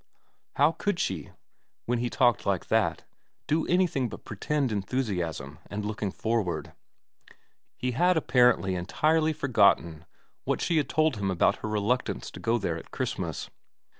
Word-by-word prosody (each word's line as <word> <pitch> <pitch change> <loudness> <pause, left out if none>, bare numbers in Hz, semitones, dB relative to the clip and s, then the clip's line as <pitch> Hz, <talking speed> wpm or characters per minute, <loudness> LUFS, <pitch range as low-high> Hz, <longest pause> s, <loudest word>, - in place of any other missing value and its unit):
How 145 +3 +4
could 190 +1 -2
she, 85 -7 -2 0.6
when 120 0 0
he 120 0 -1
talked 120 0 +2
like 100 -3 -1
that, - - +1 0.4
do 155 +2 0
anything 175 -9 +2
but - - -10
pretend 145 -5 -1
enthusiasm 90 - -2
and 105 0 -4
looking 105 -1 -2
forward? 110 -2 -2 1.0
He 125 - -1
had 180 +7 +3
apparently 125 -9 +3
entirely 155 - +1
forgotten 100 - +2 0.4
what - - -1
she 170 - +1
had 150 - +1
told 155 -6 +2
him 100 -1 -1
about 90 -3 +2
her 110 - -5
reluctance 105 - -1
to - - -10
go 115 +1 +1
there 85 -7 -2
at - - -14
Christmas. - - -4
115 Hz, 145 wpm, -28 LUFS, 95-145 Hz, 1.0 s, How